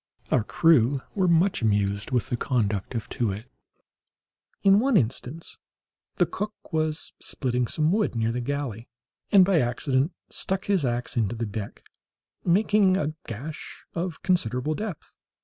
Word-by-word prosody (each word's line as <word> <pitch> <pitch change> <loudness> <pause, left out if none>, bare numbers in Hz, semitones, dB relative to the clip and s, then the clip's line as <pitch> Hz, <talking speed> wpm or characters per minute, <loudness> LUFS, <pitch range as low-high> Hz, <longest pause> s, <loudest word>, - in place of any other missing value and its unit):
Our 110 - +3
crew 140 -1 +3
were 190 -3 +2
much 170 +1 +3
amused 100 -2 +1
with 125 -3 0
the - - 0
conduct 110 -4 -1
of 115 0 -3
Too 120 - -1
wit 100 +3 -4 1.2
in 195 +1 +6
one 255 -1 +3
instance. 130 +4 -2 0.6
The 175 - +3
cook 210 +5 -4 0.2
was 155 -1 -1
splitting 125 -2 -1
some 155 +5 +1
wood 210 - +1
near 115 0 +1
the 125 +1 -2
galley, 125 -4 -3 0.4
and, 195 -3 +8
by 185 -3 +3
accident, 130 +4 +1 0.2
struck 190 0 -2
his 195 -6 +2
axe 120 0 -2
into 115 0 +1
the 115 0 -2
deck, 105 -1 -6 0.6
making 195 +1 +4
a 155 -3 -1
gash 135 +8 -7
of 170 -2 -4
considerable 155 - +1
depth. 205 -1 -6
140 Hz, 150 wpm, -26 LUFS, 115-180 Hz, 1.2 s, and